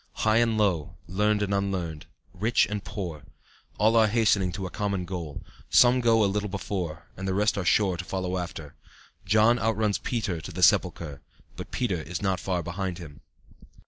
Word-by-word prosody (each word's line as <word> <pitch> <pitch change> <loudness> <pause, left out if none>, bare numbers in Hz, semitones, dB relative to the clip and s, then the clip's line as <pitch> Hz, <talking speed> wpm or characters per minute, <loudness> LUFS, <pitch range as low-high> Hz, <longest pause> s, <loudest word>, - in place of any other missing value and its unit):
High 110 0 +4
and 115 -2 +2
low, 95 -8 0
learned 105 +3 +1
and 100 0 -1
unlearned, 95 -6 -2 0.3
rich 110 +6 +2
and 105 -1 -4
poor, 90 -8 -5 0.6
all 110 +2 +3
are 110 -1 +6
hastening 105 -4 +2
to 95 +1 -4
a 90 - -6
common 100 -2 -2
goal; 85 -5 -6 0.3
some 125 +1 +5
go 115 -2 +4
a - - +4
little 105 +1 -1
before 90 -5 -4
and 95 +1 -5
the 95 - 0
rest 105 +2 +2
are 100 - -2
sure 95 -1 +3
to 90 - -4
follow 95 0 -3
after; 80 -4 -7 0.5
John 110 +4 +4
outruns 110 -2 +1
Peter 105 -9 -2
to - - -8
the - - -3
sepulchre, 75 -4 +2 0.3
but - - -8
Peter 100 -10 -1
is 90 +3 -5
not 95 -2 0
far 90 -2 -2
behind 90 +1 -4
him. 75 -5 -11
95 Hz, 180 wpm, -27 LUFS, 90-105 Hz, 0.6 s, are